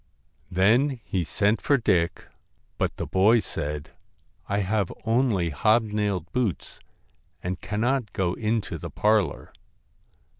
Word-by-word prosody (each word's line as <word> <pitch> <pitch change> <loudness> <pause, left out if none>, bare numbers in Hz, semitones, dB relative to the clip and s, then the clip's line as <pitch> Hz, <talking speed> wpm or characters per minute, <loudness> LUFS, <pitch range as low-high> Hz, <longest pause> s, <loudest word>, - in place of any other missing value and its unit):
Then 120 +9 +3
he 95 -3 -1
sent 100 +7 +1
for 140 - +3
Dick, 90 -8 +1 0.5
but - - -1
the - - -3
boy 105 +5 +4
said: 75 -6 -5 0.3
' - - -36
I 100 +1 +1
have 100 0 0
only 110 -8 +2
hobnailed 105 -2 +1
boots 115 - -2 0.6
and 90 -1 -3
cannot 120 +3 -1
go 90 -2 0
into 110 -1 -2
the - - -6
parlour.' 105 -8 +1
105 Hz, 120 wpm, -25 LUFS, 90-115 Hz, 0.6 s, boy